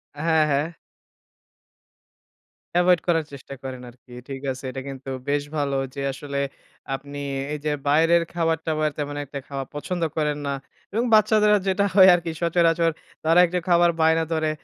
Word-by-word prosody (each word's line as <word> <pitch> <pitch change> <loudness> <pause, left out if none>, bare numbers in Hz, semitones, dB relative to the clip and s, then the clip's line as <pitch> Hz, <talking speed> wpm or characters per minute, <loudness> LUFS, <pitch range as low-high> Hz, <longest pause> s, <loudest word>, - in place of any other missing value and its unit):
আ - - -11
হ্যাঁ, 160 -2 +4
হ্যাঁ। 145 +3 +1 2.1
এভয়েড 180 0 +4
করার 165 -3 +2
চেষ্টা 140 0 -9
করেন 130 -1 -6
আরকি। 125 +1 -20 0.2
ঠিক 135 -1 -6
আছে, 130 +1 -8
এটা 135 - -6
কিন্তু 135 0 -8 0.2
বেশ 145 0 +1
ভালো 140 -2 0 0.2
যে 140 - -4
আসলে 140 +1 -5 0.6
আপনি 140 +2 -8 0.3
এইযে 150 0 -2 0.2
বাইরের 165 +4 +4
খাবার-টাবার 160 -2 0
তেমন 145 -1 -3
একটা 140 0 -6
খাওয়া 135 -1 -4
পছন্দ 175 +4 -4 0.2
করেন 150 -1 0
না। 140 - -1 0.4
এবং 230 +3 +1
বাচ্চাদের 215 0 +5
আ - - +4
যেটা 195 +1 +2
হয় 190 -2 +9
আরকি 170 -1 -3
সচরাচর 170 -1 +3 0.3
তারা 165 +2 +4
একটু 180 +1 -1
খাবার 175 0 +5
বায়না 160 +1 +4
ধরে। 160 -1 0
160 Hz, 155 wpm, -24 LUFS, 140-170 Hz, 2.1 s, হয়